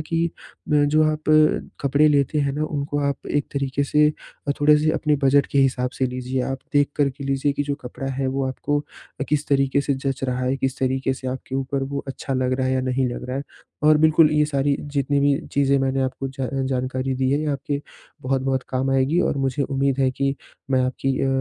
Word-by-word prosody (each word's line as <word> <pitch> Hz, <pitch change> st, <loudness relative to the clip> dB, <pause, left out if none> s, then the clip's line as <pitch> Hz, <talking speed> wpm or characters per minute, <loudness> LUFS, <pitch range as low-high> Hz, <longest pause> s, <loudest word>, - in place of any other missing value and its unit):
कि 165 Hz, +2 st, 0 dB, 0.5 s
अ, 145 Hz, -1 st, +5 dB
जो 155 Hz, +2 st, +3 dB
आप 155 Hz, 0 st, -1 dB
अ, 155 Hz, 0 st, +4 dB, 0.2 s
कपड़े 145 Hz, +3 st, +4 dB
लेते 145 Hz, 0 st, +2 dB
हैं 140 Hz, -1 st, +1 dB
ना 150 Hz, +2 st, -2 dB
उनको 145 Hz, -1 st, -3 dB
आप 140 Hz, -1 st, -2 dB
एक 145 Hz, -, +1 dB
तरीके 140 Hz, 0 st, -1 dB
से 150 Hz, +2 st, +4 dB, 0.4 s
अ, -, -, +3 dB
थोड़े-से 150 Hz, +1 st, +5 dB
अपने 150 Hz, -2 st, +1 dB
बजट 140 Hz, +1 st, +4 dB
के 140 Hz, -, +2 dB
हिसाब 130 Hz, -2 st, +2 dB
से 130 Hz, -, +2 dB
लीजिए, 125 Hz, +1 st, -3 dB
आप 135 Hz, +1 st, -3 dB
देख 145 Hz, -1 st, +3 dB
कर 145 Hz, -2 st, +2 dB
के 140 Hz, +1 st, -9 dB
लीजिए 140 Hz, +1 st, 0 dB
कि 145 Hz, -, -1 dB
जो 145 Hz, 0 st, -2 dB
कपड़ा 125 Hz, +2 st, -6 dB
है, 135 Hz, +1 st, -2 dB
वो 135 Hz, +1 st, -1 dB
आपको 145 Hz, +2 st, -1 dB, 0.4 s
अ, -, -, 0 dB
किस 150 Hz, 0 st, 0 dB
तरीके 135 Hz, 0 st, +2 dB
से 140 Hz, 0 st, 0 dB
जँच 135 Hz, 0 st, -3 dB
रहा 125 Hz, -1 st, -1 dB
है, 130 Hz, +2 st, 0 dB
किस 135 Hz, 0 st, -2 dB
तरीके 130 Hz, 0 st, 0 dB
से 130 Hz, -, -8 dB
आपके 130 Hz, 0 st, -5 dB
ऊपर 135 Hz, 0 st, -1 dB
वो 140 Hz, +1 st, -4 dB
अच्छा 135 Hz, 0 st, -4 dB
लग 130 Hz, 0 st, 0 dB
रहा 130 Hz, 0 st, 0 dB
है 130 Hz, -, +1 dB
या 130 Hz, -, +1 dB
नहीं 130 Hz, 0 st, +1 dB
लग -, -, -6 dB
रहा 130 Hz, -, -2 dB
है? 140 Hz, -, -2 dB, 0.4 s
और 155 Hz, 0 st, +6 dB
बिल्कुल 155 Hz, 0 st, +5 dB
ये 150 Hz, 0 st, +3 dB
सारी 140 Hz, -1 st, +1 dB
जितनी 140 Hz, -1 st, -1 dB
भी 140 Hz, 0 st, +3 dB, 0.2 s
चीज़ें 140 Hz, 0 st, +3 dB
मैंने 135 Hz, 0 st, 0 dB
आपको 130 Hz, +1 st, -3 dB
जा 135 Hz, -1 st, -4 dB, 0.2 s
जानकारी 130 Hz, 0 st, -1 dB
दी 130 Hz, 0 st, 0 dB
है, 145 Hz, +2 st, +2 dB
ये 155 Hz, -, -2 dB
आपके 140 Hz, +1 st, -3 dB, 0.4 s
बहुत-बहुत 130 Hz, 0 st, 0 dB
काम 130 Hz, +1 st, -1 dB
आएगी। 135 Hz, +6 st, +2 dB
और 150 Hz, -, 0 dB
मुझे 135 Hz, +1 st, 0 dB
उम्मीद 135 Hz, -1 st, 0 dB
है 130 Hz, -1 st, +3 dB
कि 135 Hz, +1 st, -1 dB, 0.4 s
मैं 130 Hz, -1 st, +3 dB
आपकी 130 Hz, +1 st, -1 dB
अ, -, -, +1 dB
135 Hz, 225 wpm, -23 LUFS, 130-145 Hz, 0.5 s, और